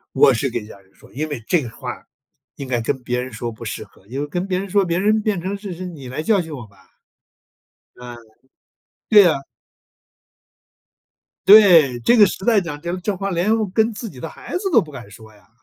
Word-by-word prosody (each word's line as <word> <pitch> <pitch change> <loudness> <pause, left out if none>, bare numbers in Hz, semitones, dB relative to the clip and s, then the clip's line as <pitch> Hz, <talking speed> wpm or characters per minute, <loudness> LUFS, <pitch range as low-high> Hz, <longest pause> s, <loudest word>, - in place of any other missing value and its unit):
我 135 0 +6
是 125 +3 -1
跟 115 -2 -4
家 105 -2 -13
人 95 0 -27
说， - - -20
因 155 +4 -4
为 145 -7 -6
这 175 +3 +2
个 125 - -6
话， 115 - -8 0.5
应 135 -2 -8
该 120 -2 0
跟 125 +3 -3
别 125 0 -2
人 130 -1 -8
说 115 +2 -5
不 110 - -11
适 - - -5
合， 95 - -23
因 130 +5 -5
为 145 - -3
跟 175 +5 -3
别 185 -2 -1
人 195 +1 -5
说， 200 +1 +2
别 170 -1 -1
人 215 +3 +2
变 210 -4 -1
成 190 +3 -4
是 200 -3 -7
是： 180 - -8
“你 140 -6 -10
来 130 +5 -5
教 210 +2 +2
训 160 -2 -8
我 125 -4 -9
吧。” 100 -1 -25 1.2
嗯， 125 -1 -10 0.9
对 210 -3 +8
啊。 150 -5 +1 2.1
对， 175 - +7
这 240 - +3
个 210 - +8
时 190 - -4
代 225 -1 +4
讲 165 -6 -6
这 170 +2 -3
这 195 +3 -3
话 195 +1 -3
连 190 +4 +1
跟 220 +4 +1
自 220 +2 -7
己 135 - -13
的 165 - -5
孩 - - -11
子 360 - -7
都 - - +6
不 155 - -10
敢 125 -7 -10
说 110 +1 -14
呀。 105 - -24
160 Hz, 240 characters per minute, -20 LUFS, 125-195 Hz, 2.1 s, 对